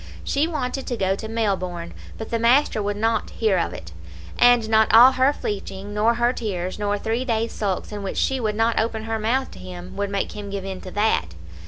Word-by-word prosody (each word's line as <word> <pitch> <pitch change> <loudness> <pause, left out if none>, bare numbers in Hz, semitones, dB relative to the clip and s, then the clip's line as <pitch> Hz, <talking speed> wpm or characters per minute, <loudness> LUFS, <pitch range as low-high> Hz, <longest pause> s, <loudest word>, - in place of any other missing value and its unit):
She 285 +3 +1
wanted 270 -4 -3
to 245 - -2
go 190 -1 +1
to 220 - -7
Melbourne, 185 -6 -2 0.2
but 220 - -7
the 230 - 0
master 235 0 +3
would 205 0 -2
not 225 +2 0
hear 210 -5 +1
of - - -1
it; 85 0 -9 0.5
and 245 -2 +5
not 220 0 +3
all 240 +4 +9
her 260 +1 +3
fleeching, 205 -5 -5
nor 220 +3 +2
her 240 +1 +2
tears, 185 -5 -4
nor 205 0 0
three 225 +4 -2
days' 230 -2 -1
sulks, 195 -2 -2
in 205 -1 -5
which 195 - -4
she 265 -1 +1
would 215 -3 -1
not 225 +1 +2
open 220 0 -1
her 225 0 -2
mouth 250 +5 0
to - - -12
him, 180 0 -9
would 200 0 -2
make 200 0 -2
him 205 -1 -7
give 195 -1 -4
in 190 -1 -6
to 185 - -8
that. 185 - 0
220 Hz, 220 wpm, -23 LUFS, 195-235 Hz, 0.5 s, all